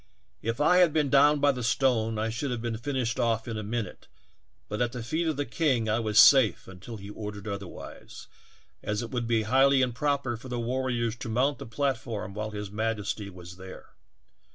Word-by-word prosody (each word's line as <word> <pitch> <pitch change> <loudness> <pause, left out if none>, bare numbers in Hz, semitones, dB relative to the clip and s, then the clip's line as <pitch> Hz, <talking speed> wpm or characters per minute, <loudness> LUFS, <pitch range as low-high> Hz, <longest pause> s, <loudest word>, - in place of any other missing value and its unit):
If 115 +3 -2
I 165 +5 +4
had 175 -4 +5
been 150 -4 +1
down 145 +1 +5
by 145 0 +4
the 125 -2 -5
stone 115 -2 +1
I 110 +1 -1
should 130 +5 -3
have 120 -2 -2
been 115 -1 -3
finished 125 -2 -2
off 115 -2 0
in 115 - -4
a 110 - -3
minute, 110 +1 -5 0.6
but 105 - -3
at 120 0 0
the 120 -2 -5
feet 160 +7 -1
of 155 -3 -1
the 145 - -1
king 135 -10 0
I 110 +2 +1
was 110 -2 -1
safe 130 -6 +6
until 95 +5 -9
he 100 0 -9
ordered 105 -1 -7
oth 100 -1 -3
erwise, 95 - -10 0.6
as 105 +2 -2
it 115 - -7
would 120 -2 -2
be 115 -2 +2
highly 135 +4 +4
improper 130 0 -1
for 130 +3 -11
the 120 -1 -3
war 130 +2 -1
riors 120 -2 -1
to 115 - -5
mount 130 +6 +1
the - - -8
platform 115 -5 -2
while 110 +1 -4
his 105 -2 -6
majesty 105 -1 -2
was 90 -1 -11
there. 95 0 -11
115 Hz, 210 wpm, -28 LUFS, 110-130 Hz, 0.6 s, safe